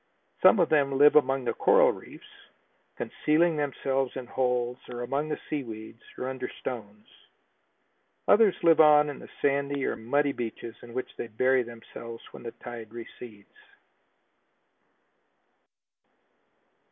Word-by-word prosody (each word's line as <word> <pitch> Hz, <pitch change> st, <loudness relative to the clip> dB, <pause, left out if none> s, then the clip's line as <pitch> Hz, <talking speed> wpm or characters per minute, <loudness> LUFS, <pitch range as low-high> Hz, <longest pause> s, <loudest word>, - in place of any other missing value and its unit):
Some -, -, +7 dB
of -, -, +3 dB
them 140 Hz, -3 st, +2 dB
live 145 Hz, +1 st, +6 dB
among 135 Hz, -3 st, +3 dB
the -, -, 0 dB
coral -, -, +4 dB
reefs, -, -, -12 dB, 0.7 s
concealing 160 Hz, +2 st, +1 dB
themselves 135 Hz, -2 st, -1 dB
in 130 Hz, -2 st, -5 dB
holes 125 Hz, 0 st, -1 dB
or 120 Hz, 0 st, -5 dB
among 140 Hz, +5 st, -2 dB
the 150 Hz, -, -3 dB
sea 150 Hz, -2 st, -2 dB
weeds 110 Hz, -2 st, -10 dB, 0.2 s
or 130 Hz, -, -4 dB
under 130 Hz, 0 st, -4 dB
stones. 105 Hz, -4 st, -7 dB, 1.2 s
Others 210 Hz, -3 st, +5 dB
live 165 Hz, -1 st, +5 dB
on 150 Hz, -1 st, +7 dB
the -, -, -12 dB
sandy 140 Hz, 0 st, 0 dB
or -, -, -1 dB
muddy 140 Hz, +5 st, 0 dB
beaches 115 Hz, -2 st, -6 dB
in 120 Hz, 0 st, -12 dB
which 130 Hz, -, -5 dB
they -, -, -5 dB
bury 130 Hz, +4 st, +2 dB
themselves 115 Hz, 0 st, -10 dB
when -, -, -11 dB
the 115 Hz, -, -6 dB
tide 115 Hz, -3 st, -8 dB
recedes. 115 Hz, -2 st, -11 dB
130 Hz, 130 wpm, -27 LUFS, 120-145 Hz, 1.2 s, Some